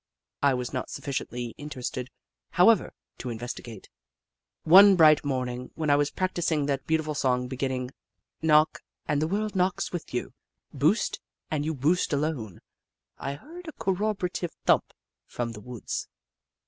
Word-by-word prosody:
I 140 -2 +4
was 125 +1 -4
not 130 - -3
sufficiently 125 -4 -4
interested, 130 -3 -5 0.4
however, 210 +5 +4 0.2
to - - -6
investio^ate. 115 -2 -7 0.8
One 195 +4 +9
bright 155 -3 +6
morning, 125 -3 -3
when 155 -2 0
I - - +6
was 145 0 +2
practising 175 -5 0
that 140 -1 -2
beautiful 160 -1 0
song 125 -3 +1
beginning: 130 -1 -3 0.3
*' - - -54
Knock, 155 +1 +4 0.3
and 150 -1 +1
the 155 - +1
world 210 +3 -2
knocks 185 0 0
with 175 -2 -5
you; 125 - -3 0.4
boost, - - +1 0.3
and 150 -2 0
you 160 +1 -2
boost 155 +5 +1
alone," 140 - -2 0.6
I 140 +1 -3
heard 335 - -12
a 315 - -6
corroborative 190 -3 -2
thump - - +4 0.4
from 120 -1 -3
the 105 -2 -9
woods. 125 0 -5
145 Hz, 145 wpm, -27 LUFS, 125-175 Hz, 0.8 s, One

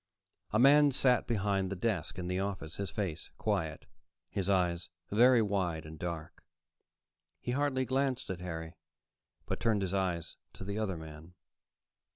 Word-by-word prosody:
A 110 - +1
man 145 +4 +7
sat 130 -2 +3
behind 100 -4 +1
the 100 - -3
desk 90 -5 -1
in 90 - -3
the 90 +1 0
office, 95 -5 -4
his 100 -2 -2
face 90 -4 -3
quiet, 85 -8 -1 0.5
his 95 -1 -1
eyes 90 -2 +1 0.2
very 120 +2 +6
wide 90 -6 -1
and 80 0 -9
dark. 85 -3 -5 1.0
He 125 - -3
hardly 130 -1 +1
glanced 130 -3 0
at 90 -1 -5
Harry, 80 -2 -5 0.7
but - - -3
turned 110 -4 +2
his 95 0 -1
eyes 90 -4 -1 0.2
to - - -8
the 100 +2 -3
other 95 -5 -1
man. 80 +2 -10
95 Hz, 155 wpm, -32 LUFS, 85-115 Hz, 1.0 s, man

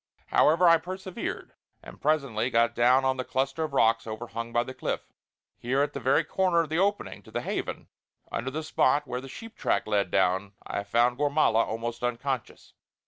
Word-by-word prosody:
However, 170 +4 +4
I 165 0 +7
persevered; 185 +2 -6 0.3
and - - -12
presently 135 -6 +1
got 115 -1 +2
down 125 +3 +4
on 130 0 +1
the 130 - -2
cluster 135 +4 -1
of 155 - -7
rocks 115 -3 +3
overhung 115 +1 -5
by 120 0 +2
the 130 - -8
cliff. 130 - -4 0.5
Here, 130 +4 +1
at 145 0 -3
the - - -4
very 135 +1 +3
corner 180 -3 +2
of 160 - -4
the 160 +2 0
opening 205 +2 -1
to - - -17
the - - -3
Haven, - - -4 0.4
under 125 +3 -2
the 155 +4 -4
spot 150 -1 +2
where 125 -1 -4
the 135 - -10
sheep 225 - -10
track - - 0
led 105 -2 +1
down, 95 +1 +1
I 100 - -3
found 120 +4 +2
Gormala 145 -6 +3
almost 115 +1 -4
unconscious. 125 +1 -3
130 Hz, 190 wpm, -27 LUFS, 115-155 Hz, 0.5 s, I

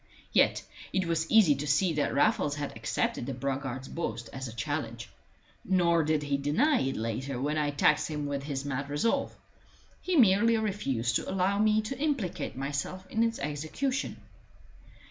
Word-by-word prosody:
Yet - - +3 0.3
it 190 -1 0
was 165 -1 -1
easy 215 -9 +6
to 145 +2 -4
see 160 +5 +2
that 150 -1 0
Raffles 145 0 +2
had 145 -4 -5
accepted 115 +2 -2
the 135 - -3
braggart's 135 0 -3
boast 115 -8 -4
as 130 -1 -5
a - - -7
challenge. 120 -1 -4 0.5
Nor 170 -3 +3
did 155 0 +1
he 140 -1 0
deny 230 - +2
it 135 0 -1
later 120 +4 -3
when 145 +3 -1
I 145 -1 +1
taxed 145 +1 +2
him 150 -2 -3
with 140 -1 -2
his 140 -1 -4
mad 140 0 -3
resolve; 145 +11 0 0.7
he 370 - -1
merely 230 - +5
refused 135 - 0
to - - -6
allow 190 +1 +1
me 215 0 +3
to 255 +4 -5
implicate 195 - -2
myself 140 +7 -3
in 225 - 0
its 230 0 +1
execution. 155 - -2
150 Hz, 165 wpm, -29 LUFS, 135-190 Hz, 0.7 s, easy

